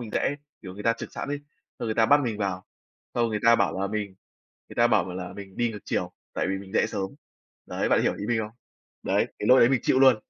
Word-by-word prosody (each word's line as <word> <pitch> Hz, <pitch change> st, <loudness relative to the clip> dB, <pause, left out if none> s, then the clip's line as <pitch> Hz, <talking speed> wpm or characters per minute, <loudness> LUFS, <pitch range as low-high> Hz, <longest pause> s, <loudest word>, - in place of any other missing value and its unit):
mình 115 Hz, -3 st, -6 dB
rẽ, 145 Hz, -, 0 dB, 0.3 s
kiểu, 95 Hz, -1 st, -8 dB
người 105 Hz, -, -7 dB
ta 115 Hz, -, +4 dB
chực 115 Hz, -, -8 dB
sẵn -, -, -5 dB
ấy, 145 Hz, 0 st, -2 dB, 0.4 s
xong 120 Hz, -, -3 dB
người 110 Hz, -, -1 dB
ta 115 Hz, 0 st, +4 dB
bắt 145 Hz, +4 st, +6 dB
mình 110 Hz, -3 st, -2 dB
vào, 95 Hz, -3 st, -2 dB, 0.5 s
xong 120 Hz, -1 st, +2 dB
người 105 Hz, -2 st, -2 dB
ta 115 Hz, 0 st, +8 dB
bảo 95 Hz, -3 st, +1 dB
là 100 Hz, -, +1 dB
mình 105 Hz, -2 st, -3 dB, 0.5 s
người -, -, -11 dB
ta 120 Hz, -, +5 dB
bảo 105 Hz, -5 st, +1 dB
là 90 Hz, -1 st, -5 dB
mình 95 Hz, -1 st, -10 dB
đi 120 Hz, -1 st, +1 dB
ngược 105 Hz, -, -7 dB
chiều, -, -, -2 dB, 0.2 s
tại -, -, 0 dB
vì 95 Hz, -, -1 dB
mình 95 Hz, 0 st, -11 dB
rẽ -, -, +3 dB
sớm. 95 Hz, 0 st, -3 dB, 0.6 s
Đấy, -, -, -1 dB
bạn -, -, +4 dB
hiểu -, -, +2 dB
ý 100 Hz, -, -5 dB
mình 120 Hz, 0 st, +1 dB
không? 105 Hz, -1 st, -4 dB, 0.5 s
Đấy, -, -, +2 dB
cái -, -, -1 dB
lỗi 130 Hz, -, +8 dB
đấy 120 Hz, -, +7 dB
mình 130 Hz, -3 st, +3 dB
chịu 130 Hz, -, +3 dB
luôn. 130 Hz, -3 st, +7 dB
110 Hz, 270 wpm, -26 LUFS, 95-120 Hz, 0.6 s, ta